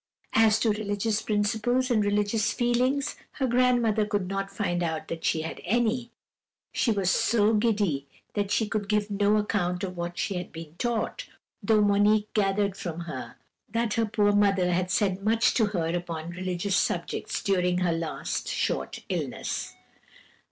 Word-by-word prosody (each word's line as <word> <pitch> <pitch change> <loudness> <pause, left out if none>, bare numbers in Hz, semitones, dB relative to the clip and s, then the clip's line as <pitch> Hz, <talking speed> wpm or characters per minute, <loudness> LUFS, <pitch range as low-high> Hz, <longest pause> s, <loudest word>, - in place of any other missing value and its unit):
As 220 -1 +5
to 225 - +3
religious 210 +1 -1
principles 225 +5 0
and 215 -3 +3
religious 205 +2 +1
feelings, 255 +3 +1 0.2
her 270 - -1
grandmother 240 -3 +3
could 205 -3 -1
not 195 +1 -2
find 195 -3 -2
out 160 -2 -2
that 165 -1 -5
she 160 - +1
had 160 - -6
any. 235 +2 0 0.6
She - - 0
was 195 -4 +1
so 220 -1 +3
giddy 205 -11 +1 0.3
that 205 -2 -1
she 220 +1 +1
could 210 -2 -3
give 210 -1 +1
no 205 +1 +3
account 180 -4 -1
of 185 -1 -4
what 175 0 -4
she 195 - -1
had 180 - -6
been 160 -2 -9
taught, 240 -2 -2 0.3
though 215 +1 +3
Monique 205 +1 +3
gathered 200 -1 +1
from 170 -3 -5
her 170 -1 -7 0.3
that 230 -2 0
her 230 -1 +1
poor 205 -1 +2
mother 195 -3 +3
had 180 +1 0
said 190 0 +1
much 225 +2 +3
to 220 -4 +3
her 170 -4 -1
upon 170 -1 -4
religious 185 +2 -2
subjects - - -1
during 180 -3 +2
her 180 -2 +1
last 165 -1 -3
short - - -2
illness. - - -3
205 Hz, 160 wpm, -27 LUFS, 180-220 Hz, 0.6 s, As